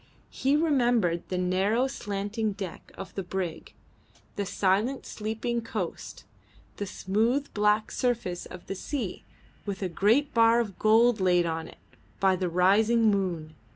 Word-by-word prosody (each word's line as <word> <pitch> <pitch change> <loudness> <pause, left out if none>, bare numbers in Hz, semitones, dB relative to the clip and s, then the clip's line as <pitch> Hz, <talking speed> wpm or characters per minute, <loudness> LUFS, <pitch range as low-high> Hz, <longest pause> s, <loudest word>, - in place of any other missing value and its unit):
He 275 +2 +1
remembered 240 - +2
the 185 - -2
narrow 190 +7 +1
slanting 210 -3 -3
deck 195 -3 -8
of 195 - -8
the 195 - -3
brig, 180 -3 -5 0.6
the 200 -1 -2
silent 205 +9 0
sleeping 225 +2 -3
coast, 215 -6 -5 0.5
the 205 - -4
smooth 225 +10 0
black 210 +1 +2
surface 235 -8 -2
of 180 - -11
the - - -4
sea 215 0 -4 0.4
with 200 -1 -4
a 185 - -1
great 225 - +2
bar 230 0 +5
of 210 -5 -3
gold 225 +1 +4
laid 180 -2 +3
on 160 -1 -3
it - - -14 0.4
by 190 -1 +3
the 180 -1 -2
rising 215 +6 +4
moon. 175 -6 -2
205 Hz, 145 wpm, -27 LUFS, 185-230 Hz, 0.6 s, bar